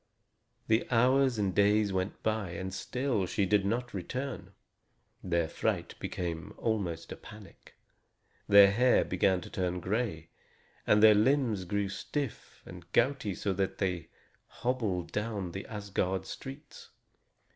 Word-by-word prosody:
The 110 Hz, +1 st, +2 dB
hours 130 Hz, +1 st, +3 dB
and 100 Hz, -3 st, 0 dB
days 105 Hz, +1 st, +3 dB
went 95 Hz, +1 st, -3 dB
by, 110 Hz, -5 st, -1 dB
and 95 Hz, +2 st, -5 dB
still 125 Hz, -4 st, -1 dB
she 100 Hz, +1 st, 0 dB
did 100 Hz, 0 st, +2 dB
not 120 Hz, +3 st, -2 dB
return. 125 Hz, +7 st, -5 dB, 0.7 s
Their 85 Hz, -2 st, +1 dB
fright -, -, -2 dB
became 85 Hz, +3 st, -4 dB
almost 95 Hz, -8 st, -2 dB
a -, -, -4 dB
panic. 105 Hz, -2 st, -14 dB, 0.7 s
Their 100 Hz, -1 st, +8 dB
hair 125 Hz, +5 st, +4 dB
began 95 Hz, 0 st, +1 dB
to -, -, -10 dB
turn 90 Hz, -1 st, -1 dB
gray, 95 Hz, -4 st, -2 dB, 0.6 s
and 105 Hz, +1 st, +5 dB
their 110 Hz, -1 st, +9 dB
limbs 110 Hz, -3 st, +2 dB
grew 100 Hz, +2 st, -1 dB
stiff 140 Hz, +8 st, -5 dB
and 90 Hz, -1 st, -12 dB
gouty 120 Hz, -6 st, +1 dB
so 100 Hz, -, -1 dB
that 95 Hz, 0 st, -2 dB
they 90 Hz, -3 st, -2 dB, 0.4 s
hobbled 105 Hz, -9 st, -2 dB
down 105 Hz, -4 st, -3 dB, 0.2 s
Asgard 95 Hz, -3 st, -2 dB
streets. 135 Hz, +8 st, -9 dB
100 Hz, 130 wpm, -30 LUFS, 95-115 Hz, 0.7 s, their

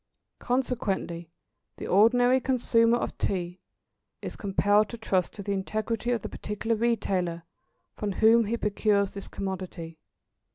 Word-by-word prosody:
Consequently, 210 Hz, -9 st, -2 dB, 0.5 s
the -, -, -6 dB
ordinary 245 Hz, +6 st, +4 dB
consumer 235 Hz, -3 st, +2 dB
of -, -, -3 dB
Tea 180 Hz, -2 st, -2 dB, 0.6 s
is -, -, -6 dB
compelled 205 Hz, +1 st, +2 dB
to 235 Hz, -, -7 dB
trust 190 Hz, -5 st, 0 dB
to 200 Hz, -, -8 dB
the 200 Hz, -, -3 dB
integrity 215 Hz, +4 st, -2 dB
of 240 Hz, -4 st, 0 dB
the -, -, -3 dB
particular 225 Hz, +2 st, -3 dB
retailer 195 Hz, -7 st, -1 dB, 0.5 s
from 205 Hz, -2 st, -3 dB
whom 225 Hz, +4 st, +5 dB
he 230 Hz, +3 st, -1 dB
procures 205 Hz, -2 st, +1 dB
this 200 Hz, -, -8 dB
commodity. 185 Hz, -4 st, -6 dB
210 Hz, 130 wpm, -27 LUFS, 190-230 Hz, 0.6 s, whom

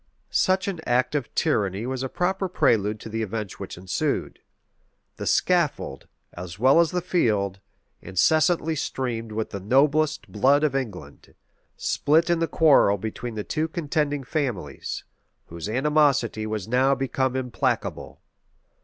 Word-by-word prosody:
[*] -, -, -44 dB
Such 190 Hz, 0 st, +2 dB
an 190 Hz, -4 st, -3 dB
act 125 Hz, +3 st, +2 dB
of 140 Hz, -6 st, -2 dB
tyranny 100 Hz, +1 st, 0 dB
was 130 Hz, 0 st, -3 dB
a 130 Hz, -, -3 dB
proper 190 Hz, +4 st, -1 dB
prelude 105 Hz, -, +2 dB
to -, -, -8 dB
the 110 Hz, +1 st, -3 dB
events 105 Hz, -2 st, -4 dB
which -, -, -7 dB
ensued. 90 Hz, 0 st, -2 dB, 0.8 s
The -, -, -5 dB
scaffold, 175 Hz, -5 st, +1 dB, 0.3 s
as 90 Hz, 0 st, -8 dB
well 130 Hz, +8 st, +5 dB
as 170 Hz, -2 st, +4 dB
the 180 Hz, -2 st, -2 dB
field, 105 Hz, -, 0 dB, 0.4 s
incessantly 160 Hz, -, +2 dB
streamed 120 Hz, -6 st, -3 dB
with 110 Hz, +1 st, -3 dB
the 100 Hz, -, -4 dB
noblest 150 Hz, +8 st, +2 dB
blood 140 Hz, +3 st, +3 dB
of 145 Hz, -3 st, +1 dB
England, 100 Hz, -, -6 dB, 0.4 s
spilt 160 Hz, +4 st, +2 dB
in 170 Hz, -, +2 dB
the 165 Hz, -, +1 dB
quarrel 145 Hz, -11 st, +4 dB
between 110 Hz, +3 st, -5 dB
the 105 Hz, -, -3 dB
two 155 Hz, +6 st, -1 dB
contending 150 Hz, -3 st, -1 dB
families, 125 Hz, -, -3 dB, 0.5 s
whose 85 Hz, +4 st, -6 dB
animosity 135 Hz, -4 st, +2 dB
was 110 Hz, -3 st, -4 dB
now 130 Hz, +3 st, +3 dB
become 130 Hz, -1 st, -1 dB
implacable. 125 Hz, -2 st, -2 dB
130 Hz, 145 wpm, -25 LUFS, 110-155 Hz, 0.8 s, well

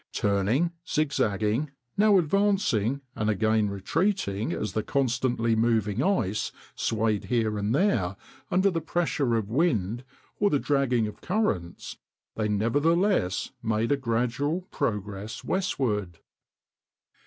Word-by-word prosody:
Turning, 105 Hz, -, +1 dB, 0.2 s
zigzagging, 115 Hz, -3 st, 0 dB, 0.3 s
now 205 Hz, -1 st, +5 dB
advancing 165 Hz, -, +1 dB
and 105 Hz, 0 st, 0 dB
again 110 Hz, 0 st, +2 dB
retreating 110 Hz, -, -1 dB
as 105 Hz, -, -3 dB
the 110 Hz, -, 0 dB
constantly 125 Hz, -3 st, 0 dB
moving 110 Hz, -1 st, +1 dB
ice 120 Hz, -, 0 dB, 0.2 s
swayed 110 Hz, -2 st, 0 dB
here 115 Hz, -3 st, 0 dB
and 105 Hz, +3 st, 0 dB
there 115 Hz, -, +1 dB, 0.3 s
under 190 Hz, +2 st, +3 dB
the 165 Hz, -2 st, -2 dB
pressure 155 Hz, -6 st, 0 dB
of 110 Hz, -2 st, -2 dB
wind 120 Hz, -, +1 dB, 0.4 s
or 205 Hz, -, +4 dB
the 145 Hz, -, +2 dB
dragging 135 Hz, -5 st, +1 dB
of 105 Hz, -, -7 dB
currents, 110 Hz, -, -2 dB, 0.4 s
they 110 Hz, -1 st, -1 dB
nevertheless 145 Hz, -, +1 dB
made 110 Hz, +2 st, 0 dB
a -, -, +5 dB
gradual 130 Hz, +6 st, -1 dB
progress 105 Hz, 0 st, -3 dB
westward. 110 Hz, -, -1 dB
115 Hz, 115 wpm, -27 LUFS, 105-155 Hz, 0.4 s, now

